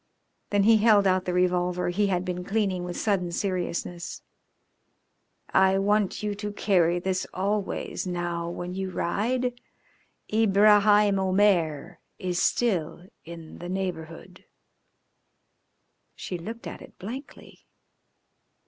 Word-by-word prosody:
Then 205 -1 +2
he 225 +2 +6
held 210 -2 +5
out 185 0 +2
the 180 - -1
revolver 180 0 +1
he 200 +3 +1
had 185 -1 -1
been 180 -1 -3
cleaning 195 -2 -1
with 175 0 -5
sudden 185 -5 0
seriousness. 175 -1 -3 1.3
"I 190 0 +4
want 205 +1 +1
you 210 -1 -1
to 205 +1 -5
carry 175 -4 +2
this 185 +1 -2
always 195 -1 -2
now 175 -1 -3
when 175 +1 -5
you 190 0 -3
ride. 245 +8 -1 0.7
Ibraheim 210 -1 +5
Omair 185 -4 +1 0.2
is 180 -1 -2
still 180 -7 0 0.2
in 165 -1 -10
the 175 - -7
neighbourhood." 180 -1 -5 1.7
She 185 - -6
looked 225 +7 -8
at - - -7
it - - -14
blankly. 255 +9 -10
190 Hz, 115 wpm, -26 LUFS, 175-205 Hz, 1.7 s, he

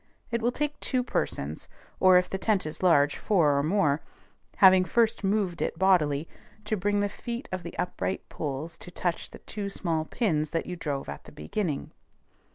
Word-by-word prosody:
It 235 0 0
will 240 +2 +2
take 295 +3 -2
two 255 -2 0
persons, 75 - -3 0.3
or, 185 -1 +7
if 180 0 +2
the 190 - -4
tent 205 -4 +1
is 155 - -6
large, 145 -6 +4
four 165 -9 +3
or 140 - +2
more, 155 -2 +2 0.5
having 185 -1 +7
first 230 +3 +1
moved 195 -3 0
it - - -1
bodily, 165 -5 +3 0.4
to 215 - 0
bring 205 +1 +1
the 205 - +2
feet 235 +4 -6
of 185 -1 -3
the 170 0 -8
upright 185 +1 -2
poles 155 +3 -5
to - - -9
touch 175 0 -2
the - - -11
two 200 -1 -5
small 165 -5 -1
pins 155 -8 0
that 165 - -2
you 180 - -5
drove 145 -5 -3
at 70 - -7
the - - -12
beginning. 150 - -3
180 Hz, 185 wpm, -28 LUFS, 155-205 Hz, 0.5 s, or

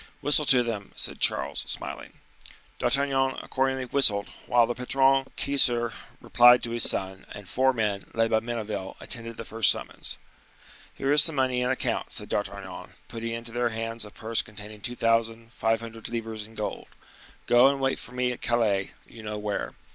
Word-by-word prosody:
"Whistle 145 +1 +3
to 125 -3 +5
them," 110 -4 -5
said - - -4
Charles, - - +1
smiling. - - -6 0.7
D'Artagnan, 135 -1 +1
accordingly, 130 0 -1
whistled, 110 -6 +3 0.2
whilst 120 -1 +4
the - - 0
patron 135 +2 +2
Keyser 120 -4 +2 0.3
replied 120 0 +6
to 115 - -3
his 120 -1 +4
son; 95 0 -3
and 100 -2 -10
four 130 +7 +2
men, 105 -5 -2
led 115 0 +2
by 110 - +4
Menneville, 110 -4 -5
attended 115 -1 -2
the 115 - -6
first 110 -4 +4
summons. - - -1 0.8
"Here 135 - -1
is 150 0 +8
some 160 - +2
money 130 -2 +1
in 125 - 0
account," 130 - -2
said - - -4
D'Artagnan, 95 -3 -5 0.2
putting 115 0 -5
into 115 0 -6
their 120 0 0
hands 115 0 -4
a 105 - -9
purse 110 +2 -2
containing 105 0 -10
two 120 +2 -3
thousand 115 0 0
five 115 0 0
hundred 115 -1 -8
livres 115 -2 -5
in 110 - -17
gold. 105 - -4 0.6
"Go 120 +2 +6
and 140 0 +1
wait 135 0 0
for - - -8
me 125 0 0
at 125 - -7
Calais, 105 -5 +1
you 115 - -13
know 105 0 -5
where." 105 -1 -3
115 Hz, 175 wpm, -27 LUFS, 110-125 Hz, 0.8 s, is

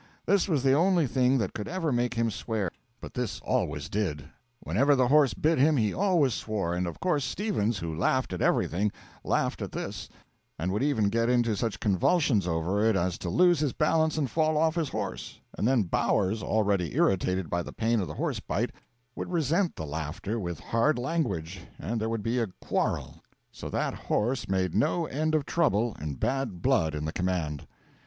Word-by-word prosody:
This 200 0 +3
was 145 -6 +1
the 135 -1 +4
only 175 +2 +3
thing 130 +1 +2
that 110 -7 -1
could 105 - -5
ever 165 -3 -1
make 120 0 0
him 115 -1 +1
swear, 105 -4 -2 0.3
but - - -9
this 125 -4 -3
always 75 +2 -1
did; 85 -8 -2 0.4
whenever 135 - +2
the 130 -2 +2
horse 145 -3 +4
bit 160 -1 +2
him 150 +2 +4
he 110 -4 +1
always 175 - +2
swore, 105 -6 -2
and 90 0 -1
of 85 - -6
course 150 -6 +1
Stevens, 120 - -1
who 85 -3 -4
laughed 125 +6 +1
at 90 - -4
everything, 100 +5 +1 0.3
laughed - - 0
at - - -5
this, - - -5 0.5
and 85 +5 -2
would 105 - -1
even 130 -8 +2
get 115 +2 +1
into 120 -3 +2
such 100 -2 -2
convulsions 105 - +2
over 85 +5 0
it 110 -1 +3
as 90 -1 0
to 90 - -4
lose 175 - +4
his 145 -4 0
balance 160 0 +2
and 140 -5 -1
fall 155 -1 +2
off 160 +1 +3
his 165 -4 -1
horse; - - -5 0.2
and 105 - 0
then 130 -4 +3
Bowers, 100 +3 +1
already 100 -7 0
irritated 95 -1 +1
by 85 +3 -1
the - - -7
pain 115 0 +1
of 95 - -2
the 75 - -7
horse - - -2
bite, - - -2 0.4
would - - -5
resent 170 +2 +1
the 80 - -5
laughter 80 +9 -4
with 85 -4 -4
hard 120 +6 +1
language, 100 - -2 0.2
and 115 +1 -3
there 110 - -1
would 115 -2 -2
be 120 +3 0
a 115 - 0
quarrel; - - -2 0.3
so - - -7
that - - -1
horse 120 +2 -1
made 95 -3 0
no 165 - +1
end 155 +2 -1
of 150 -2 +1
trouble 120 - +1
and 75 -4 -5
bad 125 -9 -2
blood 80 -1 +2
in 75 0 -3
the 80 - -3
command. 90 -5 -2
115 Hz, 195 wpm, -28 LUFS, 95-145 Hz, 0.5 s, the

